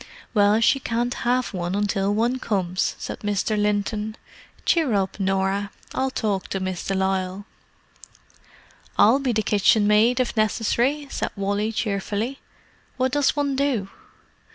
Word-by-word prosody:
"Well, 205 0 +4
she 275 +4 +4
can't 240 0 -1
have 250 0 0
one 175 0 -2
until 200 -1 0
one 235 +5 +1
comes," 185 -6 -1
said - - -6
Mr. 205 +1 -1
Linton. 210 +1 -1 0.5
"Cheer 310 -10 +2
up, 195 0 -1
Norah, 195 +1 0 0.2
I'll 265 0 0
talk 210 -7 -2
to 195 - -3
Miss 185 -1 -3
de 195 - -2
Lisle." 190 0 -1 1.5
"I'll 235 +6 +6
be 270 -3 0
the 215 -1 0
kitchenmaid, 210 +4 +4
if 250 -1 0
necessary," 235 +6 +1
said - - -2
Wally 205 +2 -1
cheerfully. 215 +4 -2 0.6
"What 260 0 +1
does 290 +1 +2
one 285 -2 0
do?" 265 -8 0
210 Hz, 135 wpm, -23 LUFS, 195-245 Hz, 1.5 s, I'll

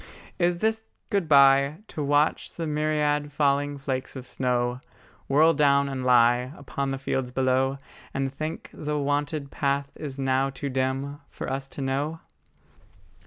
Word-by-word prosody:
Is 175 0 +2
this 220 +3 0 0.3
good 195 -6 0
bye, 140 +1 +6
To 155 - -5
watch 145 +2 +1
the 165 - -4
myriad 150 -1 0
falling 145 0 +1
flakes 135 -1 -4
of 130 -1 -7
snow 125 0 -1 0.5
Whirl 155 +4 +5
down 140 -2 +3
and 135 -2 -4
lie 125 0 +4
Upon 140 0 -3
the 135 - -2
fields 130 -1 -2
below; 130 +1 +1 0.3
And 135 0 -2
think 155 +3 -5
the 150 0 -3
wonted 145 0 -1
path 140 0 -1
is 140 -3 -7
now 135 0 +1
too 135 +1 -5
dim 135 +2 -2
For - - -6
us 135 0 -4
to 140 - -8
know? 145 +4 -1
140 Hz, 150 wpm, -26 LUFS, 135-150 Hz, 0.5 s, bye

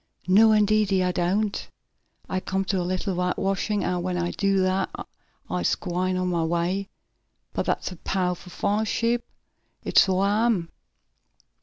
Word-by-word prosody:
"No 215 +4 +6
indeedy 210 -2 +3
I 180 - +1
doant! 195 +4 -1 0.6
I 185 - -1
come 190 +1 -2
t' - - -1
do 185 - +1
a - - -1
little 185 +2 -2
whitewashin' 195 +3 -1
an' 180 0 -1
when 180 0 -2
I 175 0 -1
do 195 -2 +1
dat 185 +1 +1 0.6
I'se 90 -1 0
gwine 185 0 -2
on 185 0 0
mah 170 -2 0
way. 175 +4 -1 0.6
But - - -2
dat's - - -1
a 180 - -9
pow'ful 180 0 -2
fine 210 +4 0
ship; 235 +2 0 0.6
it - - +4
suah 200 +4 +3
am!" 180 -8 0
185 Hz, 155 wpm, -25 LUFS, 180-200 Hz, 0.6 s, No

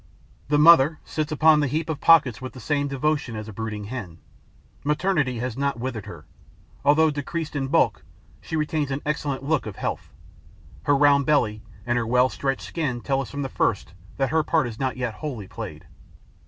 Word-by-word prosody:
The 145 - +2
mother 155 -1 +7
sits 155 0 -3
upon 155 0 +5
the 145 - +1
heap 155 +4 -2
of 160 -3 -3
pockets 140 -10 +5
with 130 - -7
the 130 - -10
same 145 +4 -1
devotion 140 -2 -1
as 110 0 -6
a 110 - -8
brooding 110 0 -5
hen. 100 -7 -7 0.7
Maternity 150 -4 0
has 125 0 -3
not 140 -2 -1
withered 120 -4 -4
her. - - -10 0.6
Although 155 +2 +4
decreased 150 +2 -4
in 135 -2 -1
bulk, 165 +5 +2 0.4
she - - -5
retains 155 -2 -1
an 135 +1 -3
excellent 145 -3 -2
look 145 -4 0
of 105 - -6
health; - - -4 0.7
her 145 - +4
round 140 -1 +4
belly 110 -8 +2 0.2
and 120 0 +1
her 115 - -2
well 125 +2 +3
stretched 135 0 -2
skin 135 -8 -3
tell 135 +1 0
us 135 - -7
from 145 0 -4
the - - -2
first - - -1 0.2
that 135 -1 +1
her 160 - +3
part 155 -1 +1
is 115 -2 -7
not 130 -1 -1
yet 125 -3 -2
wholly 120 -8 -6
played. - - -8
140 Hz, 195 wpm, -24 LUFS, 125-150 Hz, 0.7 s, mother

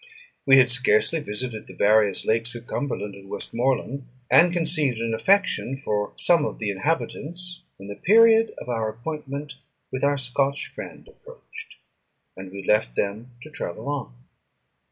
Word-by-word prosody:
We 135 0 +8
had 125 -2 +5
scarcely 125 +4 +2
visited 110 -3 -5
the - - -12
various 105 -2 +3
lakes 115 +2 0
of 120 0 -8
Cumberland 105 -7 -3
and 95 0 -13
Westmorland, 130 +3 -2 0.2
and 175 +1 +7
conceived 155 -7 0
an 115 0 -2
affection 180 - +2
for 105 -6 -2
some 170 -3 +3
of - - -3
the 105 -3 -2
inhabitants, 165 - -3 0.2
when 100 - -11
the 100 - -6
period 225 +2 +5
of - - -9
our 115 -3 -1
appointment 140 +3 -6 0.3
with 130 - -4
our 145 0 +3
Scotch 135 +2 -1
friend - - -10
approached, - - -13 0.6
and 95 0 -9
we 100 0 -7
left 95 - +2
them 110 +5 -2
to 155 - -12
travel 85 -4 -6
on. 140 - -4
125 Hz, 155 wpm, -24 LUFS, 110-150 Hz, 0.6 s, We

